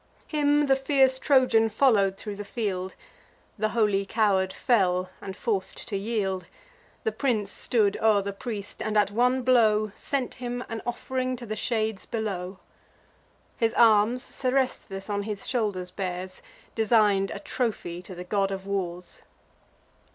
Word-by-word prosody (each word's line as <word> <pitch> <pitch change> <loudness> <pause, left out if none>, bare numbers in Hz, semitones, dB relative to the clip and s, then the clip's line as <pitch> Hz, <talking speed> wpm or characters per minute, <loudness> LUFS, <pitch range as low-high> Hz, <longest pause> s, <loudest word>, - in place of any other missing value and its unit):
Him 295 -1 +2
the 270 -1 +4
fierce 265 -1 +3
Trojan 255 -5 +4
follow'd 205 -5 +3
thro' 210 0 -6
the 205 +1 -6
field: 195 -4 -3 0.6
The 215 +1 +1
holy 210 -3 +2
coward 195 -3 +1
fell; 185 -6 +1
and, 190 0 -7
forc'd 195 -5 -2
to 205 - -3
yield, 195 -3 -2 0.6
The 445 - 0
prince 220 - -1
stood 210 -5 +1
o'er 215 -2 +4
the 200 0 -4
priest, 205 -1 -6
and, 215 0 -1
at 205 -1 +3
one 250 +4 +2
blow, 215 -4 +3
Sent 275 -4 -2
him 245 0 -3
an 225 -1 -4
off'ring 255 +1 -2
to 240 -1 -9
the 215 -1 -4
shades 220 -3 -2
below. 195 -5 -3 1.0
His 230 0 +1
arms 230 +2 +4
Seresthus 255 -9 -1
on 205 -1 -1
his 205 -1 -3
shoulders 205 -7 -1
bears, 185 0 -5 0.3
Design'd 210 -3 +3
a - - -5
trophy 195 -8 -3
to 185 +1 -10
the 180 - -6
God 195 +1 0
of 195 -1 -5
Wars. 180 -3 -4
215 Hz, 145 wpm, -26 LUFS, 195-240 Hz, 1.0 s, the